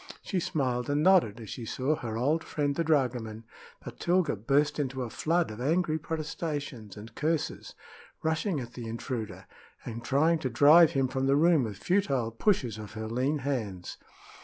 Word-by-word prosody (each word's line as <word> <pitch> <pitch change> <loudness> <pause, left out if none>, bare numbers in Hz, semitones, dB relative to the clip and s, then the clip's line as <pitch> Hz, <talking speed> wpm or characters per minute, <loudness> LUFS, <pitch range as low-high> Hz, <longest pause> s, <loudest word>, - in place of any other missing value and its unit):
She 190 - -1
smiled 130 -8 -1
and 145 +1 +1
nodded 165 - +4
as 110 -3 -9
she 120 - -6
saw 130 +6 -1
her 115 -5 -5
old 150 +7 +1
friend 145 -2 -1
the 170 - 0
dragoman, 125 -8 0 0.4
but - - -9
Tilga 180 -4 +2
burst 145 +8 +1
into 130 -2 -2
a 115 - -6
flood 170 -3 0
of 110 +2 -8
angry 160 +3 +1
protestations 145 - -5
and 110 +2 -10
curses, 155 +3 -2 0.5
rushing 160 +1 0
at 120 -1 -7
the 120 -2 -7
intruder 110 -5 -5 0.4
and 115 0 -6
trying 155 +4 +2
to 130 - -2
drive 150 +7 +6
him 135 -1 +2
from 130 +1 -1
the 135 - +4
room 160 -3 +4
with 105 -3 -6
futile 140 - 0
pushes 120 - 0
of 105 0 -9
her 110 0 -5
lean 130 +6 0
hands. 105 -10 -3
135 Hz, 175 wpm, -29 LUFS, 115-155 Hz, 0.5 s, drive